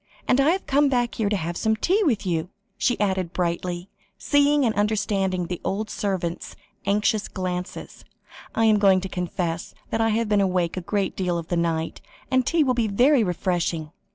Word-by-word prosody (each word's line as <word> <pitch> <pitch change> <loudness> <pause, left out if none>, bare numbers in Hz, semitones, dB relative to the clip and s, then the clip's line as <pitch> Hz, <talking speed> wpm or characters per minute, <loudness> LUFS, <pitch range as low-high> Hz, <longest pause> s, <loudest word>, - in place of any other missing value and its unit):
And 255 +2 +4
I 280 - +4
have 375 +3 0
come 285 +1 +3
back 245 -3 +1
here 215 -3 0
to 210 - +1
have 170 -2 -3
some 220 +4 +1
tea 370 - +1
with 235 - +1
you," 170 -1 -1 0.3
she 245 - 0
added 190 -3 0
brightly, 175 0 -2 0.3
seeing 285 -1 +3
and 225 - +2
understanding 200 -3 0
the 175 0 -5
old 210 +2 -2
servant's 185 -4 -3 0.3
anxious 210 +1 +1
glances. 180 -1 -5 0.5
"I 225 - +3
am 215 -1 +4
going 195 -2 +5
to 190 - -4
confess 175 -2 -3 0.2
that 225 - 0
I 225 - +3
have 225 +1 +1
been 210 -1 +3
awake 180 -3 0
a 185 - -3
great 195 +2 -1
deal 180 -2 -1
of 165 -1 -6
the 175 - 0
night, 165 -1 -1 0.3
and 255 -1 +2
tea 335 -2 +3
will 260 -3 +2
be 235 -2 +1
very 245 +5 +4
refreshing." 175 -4 -1
200 Hz, 190 wpm, -24 LUFS, 180-225 Hz, 0.5 s, going